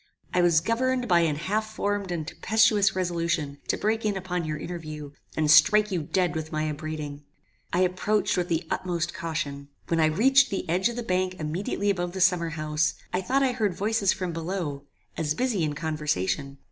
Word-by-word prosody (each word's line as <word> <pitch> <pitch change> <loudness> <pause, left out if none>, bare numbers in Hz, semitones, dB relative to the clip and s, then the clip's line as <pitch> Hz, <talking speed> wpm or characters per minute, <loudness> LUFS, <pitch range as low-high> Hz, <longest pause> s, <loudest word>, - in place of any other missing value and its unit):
I 180 - +3
was 170 -2 +4
governed 250 +5 0
by 175 -2 +5
an 160 -3 +2
half 215 +7 -2
formed 205 -2 -1
and 165 -3 -2
tempestuous 210 0 +3
resolution 170 -5 -1
to - - 0
break 220 +2 0
in 210 -2 0
upon 180 -2 -3
your 155 0 -3
interview, 155 -3 -7 0.3
and 155 -1 +3
strike 210 +7 +6
you 180 -3 0
dead 175 +3 0
with 155 0 -4
my 155 -1 -1
upbraiding. 150 -1 -5 0.5
"I 175 - +2
approached 185 +3 +1
with 180 -1 0
the 170 -1 -1
utmost 175 -2 -1
caution. 145 -4 -4 0.2
When 165 - +1
I 160 - +5
reached 265 - +4
the 195 -2 -3
edge 180 +6 +2
of 235 - -5
the 240 - -3
bank 185 -2 0
immediately 185 +6 -1
above 175 -2 -3
the 190 - -5
summer 180 -2 +3
house, 155 -1 0 0.2
I 180 - +1
thought 270 +8 +1
I 260 - +3
heard 215 -7 -1
voices 205 -1 +1
from 185 -3 -3
below, 165 -4 -4 0.3
as 155 -2 0
busy 230 -5 0
in 150 -1 -1
conversation. 145 - -2
175 Hz, 190 wpm, -26 LUFS, 155-200 Hz, 0.5 s, strike